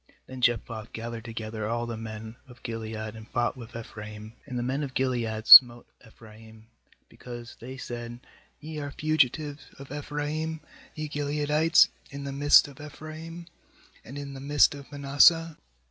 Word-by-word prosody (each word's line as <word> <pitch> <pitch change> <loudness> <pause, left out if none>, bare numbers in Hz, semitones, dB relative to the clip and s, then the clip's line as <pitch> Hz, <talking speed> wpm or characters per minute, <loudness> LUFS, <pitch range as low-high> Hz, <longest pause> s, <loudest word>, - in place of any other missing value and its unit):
4Then 130 0 -9
Jephthah 115 -2 0
gathered 115 0 -6
together 110 -1 -5
all 120 +1 -2
the 120 -1 -5
men 110 0 -8
of 125 -3 -17
Gilead, 115 -2 -5 0.2
and 110 0 -11
fought 120 +1 -1
with 120 -1 -11
Ephraim; 105 -1 -9
and 125 -2 -5
the 120 - -2
men 135 +4 -2
of 135 -3 -5
Gilead 115 -4 -1
smote 120 -1 +10 0.2
Ephraim, 110 -1 -16 0.4
because 120 -1 -10
they 130 +3 -9
said: 120 -2 -7 0.4
'Ye 155 0 -7
are 145 -1 -5
fugitives 150 0 0
of 135 -1 -12
Ephraim, 150 +2 -4 0.4
ye 155 0 -4
Gileadites, 150 +2 +3 0.2
in 140 0 -8
the 140 - -5
midst 145 +1 +6
of 140 0 -13
Ephraim, 155 +3 -9 0.6
and 135 +5 -10
in 140 -1 -7
the 135 - -8
midst 145 +1 +4
of 140 0 -11
Manasseh.' 145 +3 +4
130 Hz, 155 wpm, -27 LUFS, 115-145 Hz, 0.6 s, smote